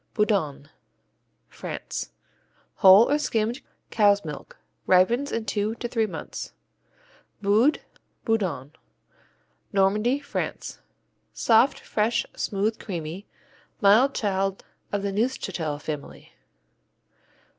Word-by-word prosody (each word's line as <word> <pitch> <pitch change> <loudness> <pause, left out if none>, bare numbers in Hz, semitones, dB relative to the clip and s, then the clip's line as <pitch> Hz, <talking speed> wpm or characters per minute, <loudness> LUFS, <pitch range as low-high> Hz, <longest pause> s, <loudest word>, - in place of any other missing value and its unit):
Boudanne 160 -10 0 0.8
France - - -6 0.7
Whole 195 +3 +8
or 295 - +3
skimmed 230 -3 -1 0.3
cow's 205 -3 +3
milk, 150 -2 -8 0.3
ripens 230 +10 +3
in 230 -1 -2
two 210 +1 -1
to 240 - -4
three 225 -2 0
months. - - -7 0.9
Boudes, 215 +8 +3 0.5
Boudon 175 - -1 1.0
Normandy, 210 +6 +2
France 285 - -5 0.5
Soft, 240 +4 +3
fresh, 220 +2 0
smooth, 210 +2 -1
creamy, 175 0 -6 0.5
mild 225 +7 +5
child 195 -2 -1 0.3
of 205 -1 -2
the 200 - -1
Neufchâtel 195 - -2
family. 150 -1 -7
205 Hz, 90 wpm, -25 LUFS, 190-230 Hz, 1.0 s, Whole